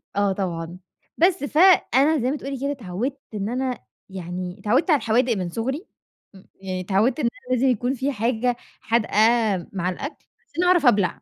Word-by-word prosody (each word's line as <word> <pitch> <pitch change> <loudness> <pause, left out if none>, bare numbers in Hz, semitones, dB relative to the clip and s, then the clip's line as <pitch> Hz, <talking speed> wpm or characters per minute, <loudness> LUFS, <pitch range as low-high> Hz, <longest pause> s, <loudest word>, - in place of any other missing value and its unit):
آه 200 0 +2
طبعًا، 175 -3 -4 0.4
بس 355 0 +3
فأنا 310 -2 +4
زي 250 +1 0
ما 295 - -2
تقولي 275 -2 -6
كده 280 +2 -1
اتعَوِدت 250 +3 -4
إن 205 0 -3
أنا 255 +1 -2 0.3
يعني، 180 0 -6
اتعَوِدت 245 - +1
على 300 - +6
الحوادق 240 0 +1
من 180 -2 -3
صُغري 265 - -3 0.5
م 190 - -15
يعني 185 -1 -5
اتعَوِدت 205 - +1
إن 280 - 0 0.2
أنا 255 - +1
لازم 255 +2 +2
يكون 245 +1 +1
في 270 +2 -1
حاجة 240 +1 0 0.3
حادقة 230 -1 0 0.6
مع 185 -2 -1
الأكل، 275 - -7 0.2
عشان 335 +4 -2
اعرف 360 -3 +4
ابلع، 205 -7 +3
240 Hz, 170 wpm, -23 LUFS, 195-275 Hz, 0.6 s, على